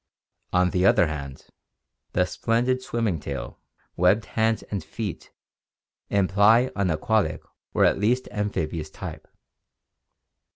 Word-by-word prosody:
On 90 -1 +3
the 90 - +1
other 95 -2 +5
hand, 70 -4 -6 0.7
the 90 - +3
splendid 120 +6 0
swimming 115 -9 -1
tail, 70 -4 -6 0.4
webbed 95 +5 +3
hands 110 0 +1
and 100 -5 -5
feet 105 -1 -6 0.8
imply 100 +5 +4
an 100 -2 +1
aquatic 100 +7 0 0.3
or - - +5
at - - +2
least 120 +5 +1
amphibious 80 -7 -2
type. - - -8
100 Hz, 115 wpm, -25 LUFS, 85-110 Hz, 0.8 s, other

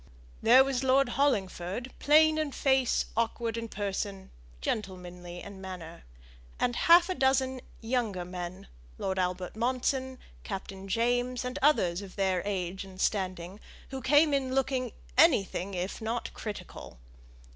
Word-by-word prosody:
There 250 +4 +7
was 270 -1 -1
Lord 265 0 +4
Hollingford, 230 -3 -1
plain 310 +1 +5
in 300 -3 -2
face, 265 -3 +2
awkward 230 0 -1
in 230 0 -4
person, 200 -2 -4 0.3
gentlemanly 180 - -5
in 200 -1 -10
manner; 180 -3 -8 0.5
and 245 -1 +1
half 345 +5 +6
a 370 - -1
dozen 265 -3 +1 0.2
younger 225 -6 -1
men, 180 +1 -6 0.3
Lord 190 0 -2
Albert 180 0 -2
Monson, 260 +2 -1 0.3
Captain 195 -1 -6
James, 245 +4 0
and 250 +3 -4
others 190 - +3
of 195 -2 -10
their 190 -2 +1
age 190 -2 -3
and 190 -1 -13
standing, 185 -1 -1 0.3
who 265 -1 -5
came 290 +4 +4
in 265 -2 0
looking 265 -2 0 0.3
anything 200 - +3
if 180 +4 -4
not 230 +2 -3
critical. 210 - -8
225 Hz, 135 wpm, -29 LUFS, 190-260 Hz, 0.5 s, There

